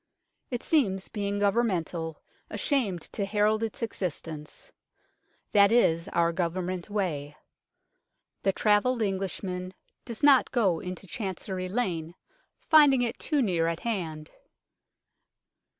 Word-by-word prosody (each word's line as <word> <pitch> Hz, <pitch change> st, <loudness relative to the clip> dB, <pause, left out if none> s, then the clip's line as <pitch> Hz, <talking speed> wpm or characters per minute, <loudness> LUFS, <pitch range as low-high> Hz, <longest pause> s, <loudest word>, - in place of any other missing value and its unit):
It 245 Hz, -2 st, -4 dB
seems, 195 Hz, -, +1 dB
being 205 Hz, -1 st, -2 dB
Governmental, 185 Hz, -6 st, 0 dB, 0.3 s
ashamed 220 Hz, -, 0 dB
to 205 Hz, -, -1 dB
herald 210 Hz, +2 st, +2 dB
its 225 Hz, +1 st, -3 dB
existence. 160 Hz, -7 st, -5 dB, 0.8 s
That 200 Hz, 0 st, +6 dB
is 170 Hz, -7 st, +3 dB
our 170 Hz, -2 st, +1 dB
Government 180 Hz, +2 st, -2 dB
way. 155 Hz, -8 st, -2 dB, 1.0 s
The 195 Hz, -, +2 dB
travelled 220 Hz, +4 st, +2 dB
Englishman 185 Hz, -2 st, -3 dB, 0.3 s
does 235 Hz, 0 st, -7 dB
not 280 Hz, -3 st, +6 dB
go 195 Hz, -10 st, +2 dB
into 180 Hz, +1 st, -7 dB
Chancery 190 Hz, -2 st, -4 dB
Lane, 175 Hz, -7 st, -2 dB, 0.5 s
finding 290 Hz, -5 st, +6 dB
it 235 Hz, -, -3 dB
too 295 Hz, -4 st, +1 dB
near 170 Hz, -6 st, +1 dB
at 165 Hz, 0 st, -2 dB
hand. 165 Hz, -9 st, -4 dB
195 Hz, 110 wpm, -28 LUFS, 170-225 Hz, 1.0 s, That